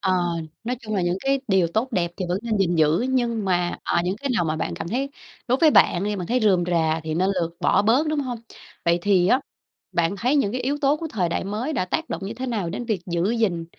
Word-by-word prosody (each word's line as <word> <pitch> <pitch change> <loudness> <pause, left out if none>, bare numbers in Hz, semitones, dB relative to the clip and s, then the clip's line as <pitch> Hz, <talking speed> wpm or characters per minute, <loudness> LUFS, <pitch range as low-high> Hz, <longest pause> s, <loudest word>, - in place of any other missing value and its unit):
ờ, 190 - +1 0.5
nói 250 +2 -2
chung 215 -3 -5
là 190 - +1
những 175 +1 0
cái 275 +3 +1
điều 190 -3 +4
tốt 225 +9 -1
đẹp 175 -4 0
thì 185 - -3
vẫn 180 +2 0
nên 230 -2 -1
gìn 175 -3 +2
giữ, 155 +1 +3
nhưng 240 -4 0
mà, 175 -2 0
ờ, - - 0
những 185 +2 -1
cái 275 +5 -3
nào 175 - +2
mà 155 -1 -1
bạn 90 - -3
cảm 165 - -5
thấy 265 +7 -2 0.4
đối 255 +2 +2
với 315 - +6
bạn 175 -9 +4
đi, 210 0 -1
bạn 180 -3 -4
thấy 250 +5 +1
rườm 190 -5 +3
rà 165 -2 +1
thì 155 0 -2
nên 185 +4 +2
lược 170 0 -4
bỏ 200 - +3
bớt, 245 +9 +3
đúng 305 -1 0
hông? 250 -4 -4 0.5
Vậy 170 0 +3
thì 190 -3 +3
á 255 - +4 0.5
bạn 170 +3 +1
thấy 250 +8 +1
những 210 -8 +1
cái 255 - -2
yếu 275 +4 -1
tố 285 0 +3
của 325 - -5
thời 185 -5 0
đại 170 - -2
mới 215 +9 -3
đã 185 - 0
tác 320 - -3
động - - -4
như 215 - -5
thế 255 +3 -5
nào 210 -9 -2
đến 220 +7 -4
việc 220 -6 -1
giữ 175 +3 0
gìn 210 -8 0
200 Hz, 270 wpm, -23 LUFS, 175-245 Hz, 0.5 s, với